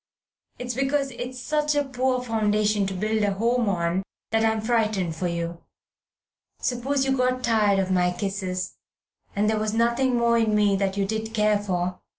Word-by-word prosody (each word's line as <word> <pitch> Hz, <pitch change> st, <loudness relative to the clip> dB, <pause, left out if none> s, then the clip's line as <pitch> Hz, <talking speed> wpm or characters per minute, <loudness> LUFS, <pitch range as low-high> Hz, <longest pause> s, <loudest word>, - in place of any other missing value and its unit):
It's 245 Hz, 0 st, -4 dB
because 275 Hz, +2 st, 0 dB
it's 250 Hz, +1 st, -6 dB
such 300 Hz, +3 st, 0 dB
a 290 Hz, -, +2 dB
poor 255 Hz, -1 st, -1 dB
foundation 210 Hz, -3 st, +1 dB
to 195 Hz, -, -3 dB
build 215 Hz, +3 st, 0 dB
a 205 Hz, -1 st, +1 dB
home 230 Hz, +2 st, +1 dB
on 175 Hz, 0 st, 0 dB, 0.3 s
that 225 Hz, 0 st, +2 dB
I 225 Hz, -, +4 dB
am 220 Hz, 0 st, -1 dB
frightened 215 Hz, -7 st, 0 dB
for 180 Hz, +2 st, -2 dB
you. 170 Hz, 0 st, -4 dB, 1.0 s
Suppose 265 Hz, +2 st, 0 dB
you 265 Hz, 0 st, +1 dB
got 255 Hz, 0 st, 0 dB
tired 215 Hz, -4 st, +3 dB
of 190 Hz, -1 st, 0 dB
my 180 Hz, -1 st, +2 dB
kisses, 185 Hz, -1 st, -3 dB, 0.6 s
and 205 Hz, +1 st, +1 dB
there 215 Hz, 0 st, +1 dB
was 215 Hz, 0 st, -1 dB
nothing 235 Hz, +2 st, +2 dB
more 235 Hz, 0 st, +3 dB
in 220 Hz, -2 st, +2 dB
me 205 Hz, -1 st, +3 dB
that 195 Hz, 0 st, -1 dB
you 200 Hz, -, +1 dB
did 220 Hz, +2 st, -3 dB
care 210 Hz, -1 st, +3 dB
for. 180 Hz, -2 st, -2 dB
220 Hz, 180 wpm, -25 LUFS, 195-245 Hz, 1.0 s, I